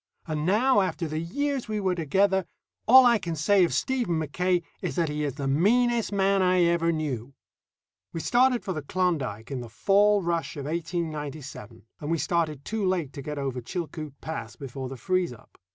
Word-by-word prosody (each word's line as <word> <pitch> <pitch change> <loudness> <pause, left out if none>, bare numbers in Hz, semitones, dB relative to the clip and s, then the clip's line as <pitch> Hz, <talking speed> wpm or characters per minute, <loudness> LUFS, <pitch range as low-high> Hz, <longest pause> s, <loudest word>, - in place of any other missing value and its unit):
And 155 0 -2
now, 225 +4 +4
after 180 -3 -2
the 155 +1 -3
years 275 - -2
we 215 -1 -2
were 190 -2 +1
together, 190 +4 +1 0.4
all 260 +2 +9
I 235 -2 +5
can 170 -4 -4
say 185 +6 +4
of 170 - +1
Stephen 245 -11 0
Mackaye 175 +4 0 0.2
is - - -3
that 170 -4 +1
he 150 0 -2
is 140 -3 -2
the 140 -2 -3
meanest 230 - +2
man 195 -1 +2
I 180 -1 +4
ever 170 -1 +2
knew. 140 -5 -3 0.8
We 165 - -4
started 250 +6 +3
for 190 - -2
the 155 - -4
Klondike 140 - -2
in 130 -2 -3
the 120 - -8
fall 200 - +3
rush 170 -2 -2
of 140 - -5
1897, 150 - -5 0.2
and 150 - -5
we 165 - +1
started 155 -4 -1
too 220 -1 -2
late 180 -7 0
to 140 - -7
get 150 +2 -5
over 135 -3 -3
Chilcoot 155 0 -5
Pass 120 -8 -6
before 130 0 -6
the 135 - -7
freeze 185 -1 0
up. 115 - -19
170 Hz, 190 wpm, -26 LUFS, 145-195 Hz, 0.8 s, all